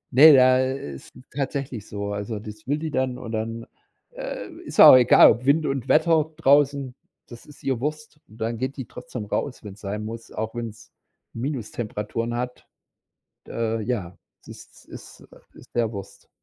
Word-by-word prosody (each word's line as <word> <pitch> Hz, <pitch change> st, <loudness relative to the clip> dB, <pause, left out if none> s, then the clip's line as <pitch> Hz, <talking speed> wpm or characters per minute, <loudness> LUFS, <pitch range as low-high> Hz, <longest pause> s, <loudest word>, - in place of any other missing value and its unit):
Ne, 155 Hz, +4 st, +10 dB
da 130 Hz, 0 st, +6 dB
ist 130 Hz, -, -5 dB, 0.2 s
tatsächlich 135 Hz, -5 st, -4 dB
so. 100 Hz, 0 st, -4 dB
Also, 105 Hz, +2 st, -4 dB
das 105 Hz, +2 st, -11 dB
will 145 Hz, -, +1 dB
die 155 Hz, 0 st, -4 dB
dann, 130 Hz, -2 st, -1 dB
und 120 Hz, -3 st, -8 dB
dann, 115 Hz, +1 st, -4 dB, 0.5 s
äh, -, -, -6 dB, 0.2 s
ist -, -, -9 dB
ihr -, -, +11 dB
auch -, -, +11 dB
egal, 125 Hz, -1 st, +7 dB
ob 125 Hz, +3 st, -3 dB
Wind 150 Hz, +3 st, +3 dB
und 135 Hz, -3 st, -2 dB
Wetter 160 Hz, -2 st, +3 dB
draußen, 140 Hz, -3 st, +3 dB, 0.3 s
das 120 Hz, -1 st, -12 dB
ist 150 Hz, -, -16 dB
ihr 130 Hz, -4 st, -1 dB
Wurst. 150 Hz, 0 st, -5 dB
Und 110 Hz, -, -16 dB
dann 115 Hz, +1 st, -3 dB
geht 130 Hz, +2 st, -3 dB
die 130 Hz, -, -5 dB
trotzdem 125 Hz, -1 st, -8 dB
raus, 125 Hz, +6 st, -3 dB
wenn's 105 Hz, -1 st, -10 dB
sein 105 Hz, +1 st, -4 dB
muss, 115 Hz, +1 st, -8 dB
auch 110 Hz, +1 st, -4 dB
wenn's 115 Hz, -2 st, -7 dB, 0.4 s
Minustemperaturen 115 Hz, -2 st, -4 dB
hat. 125 Hz, +1 st, -5 dB, 0.8 s
Äh, 115 Hz, -1 st, -2 dB
ja, 105 Hz, -7 st, -3 dB, 0.3 s
es -, -, -23 dB
ist -, -, -14 dB
ist -, -, -13 dB, 0.3 s
ist -, -, -16 dB
der 115 Hz, -2 st, +1 dB
Wurst. 100 Hz, -3 st, -10 dB
120 Hz, 170 wpm, -24 LUFS, 110-135 Hz, 0.8 s, ihr